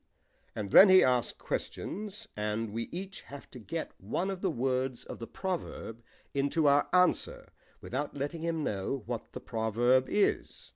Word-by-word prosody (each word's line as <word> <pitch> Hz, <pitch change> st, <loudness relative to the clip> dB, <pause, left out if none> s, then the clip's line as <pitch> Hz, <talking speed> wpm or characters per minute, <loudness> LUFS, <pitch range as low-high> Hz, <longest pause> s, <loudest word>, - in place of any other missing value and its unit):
"And 100 Hz, -2 st, -4 dB
then 195 Hz, -, +10 dB
he 185 Hz, 0 st, +8 dB
asks 125 Hz, -2 st, +1 dB
questions, 210 Hz, 0 st, -5 dB
and 105 Hz, +1 st, -2 dB
we 115 Hz, +1 st, -3 dB
each 190 Hz, +2 st, -6 dB
have 140 Hz, 0 st, -11 dB
to 125 Hz, -, -10 dB
get 160 Hz, +9 st, -5 dB
one 190 Hz, +3 st, -2 dB
of 190 Hz, -1 st, -6 dB
the 190 Hz, -, +1 dB
words 130 Hz, -3 st, -1 dB
of -, -, -8 dB
the 115 Hz, -, -6 dB
proverb 175 Hz, -, -5 dB, 0.3 s
into 140 Hz, +3 st, +1 dB
our 140 Hz, +1 st, +4 dB
answer, 180 Hz, -1 st, +2 dB, 0.3 s
without 145 Hz, +3 st, -4 dB
letting 145 Hz, +4 st, -3 dB
him 165 Hz, -2 st, -1 dB
know 105 Hz, +3 st, -2 dB
what 115 Hz, 0 st, -5 dB
the -, -, -5 dB
proverb 120 Hz, +3 st, +2 dB
is. 205 Hz, -, 0 dB
140 Hz, 160 wpm, -30 LUFS, 115-175 Hz, 0.3 s, then